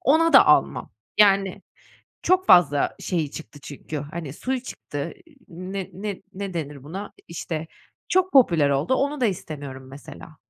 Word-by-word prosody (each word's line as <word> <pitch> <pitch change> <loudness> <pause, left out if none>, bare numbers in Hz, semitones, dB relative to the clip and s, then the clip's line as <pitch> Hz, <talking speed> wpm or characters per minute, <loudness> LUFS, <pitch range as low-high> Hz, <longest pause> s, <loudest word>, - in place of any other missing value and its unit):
Ona 325 +5 +3
da - - +8
almam. - - +3 0.3
Yani, 195 -1 +4 0.6
çok 370 0 +2
fazla 155 -5 +5
şeyi 160 -6 -2
çıktı 155 -2 -10
çünkü, 150 +2 -7
hani, 150 0 -6
suyu 255 - -3
çıktı. 145 - -6
Iıı, 310 -4 -22 0.4
ne 195 -2 -4
ne 200 0 -6
ne 195 -1 -6
denir 145 -4 -5
buna? 190 +7 -7 0.2
İşte, 160 -1 -5 0.4
çok 370 0 +2
popüler 170 - +5
oldu, 140 - +1
onu 280 +2 -1
da 245 - +3
istemiyorum, 140 -8 -6
mesela. 145 +3 -12
175 Hz, 150 wpm, -24 LUFS, 150-235 Hz, 0.6 s, da